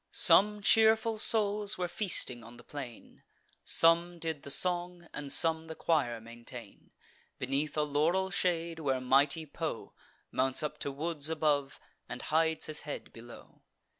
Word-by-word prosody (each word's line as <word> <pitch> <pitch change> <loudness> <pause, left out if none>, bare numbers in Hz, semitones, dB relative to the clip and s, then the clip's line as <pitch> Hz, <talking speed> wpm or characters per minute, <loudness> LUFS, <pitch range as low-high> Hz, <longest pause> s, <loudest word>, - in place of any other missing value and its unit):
Some 210 0 +4
cheerful 220 +1 +4
souls 210 -1 +2
were 180 -1 -2
feasting 170 - -1
on 115 +1 -13
the 120 - -15
plain; 130 -5 -10 0.4
Some 170 +1 +3
did 160 -3 -4
the - - -10
song, 175 +2 +1
and 145 -1 -4
some 160 +1 +3
the 160 0 -8
choir 140 -10 0
maintain, 115 -1 -11 0.5
Beneath 140 +3 -2
a 150 - +2
laurel 165 +6 0
shade, 170 -3 -1
where 135 -4 -1
mighty 140 +5 +2
Po 155 -3 -6 0.4
Mounts 130 +2 0
up 150 - -4
to 140 - -3
woods 150 +1 -2
above, 145 -4 0 0.3
and - - -6
hides 160 +1 0
his 155 -1 -4
head 150 - -8
below. 120 +1 -14
155 Hz, 145 wpm, -31 LUFS, 135-175 Hz, 0.5 s, Some